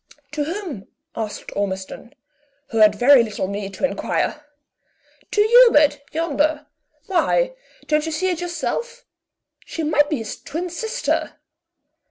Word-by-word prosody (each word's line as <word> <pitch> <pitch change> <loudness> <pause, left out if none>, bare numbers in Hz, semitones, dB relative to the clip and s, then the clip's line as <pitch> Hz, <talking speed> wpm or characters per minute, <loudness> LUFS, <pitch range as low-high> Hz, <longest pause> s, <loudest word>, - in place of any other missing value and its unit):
"To 300 -1 -2
whom?" 330 - -5 0.3
asked 220 -2 -5
Ormiston, 200 +6 -4 0.5
who 225 - -1
had 210 -1 +6
very 250 +4 +6
little 215 -4 -3
need 200 0 -5
to 230 - 0
inquire. 300 +2 -2 0.9
"To 415 - +2
Hubert, 420 - +6
yonder. 305 -1 0 0.4
Why, - - +1 0.3
don't 305 +1 +1
you - - -2
see 370 +4 0
it 350 -1 -3
yourself? 470 +8 -4 0.6
She 325 - -5
might 295 -1 +2
be 305 - 0
his 225 -3 -7
twin 335 +5 -5
sister!" 445 +6 -2
300 Hz, 130 wpm, -21 LUFS, 225-350 Hz, 0.9 s, had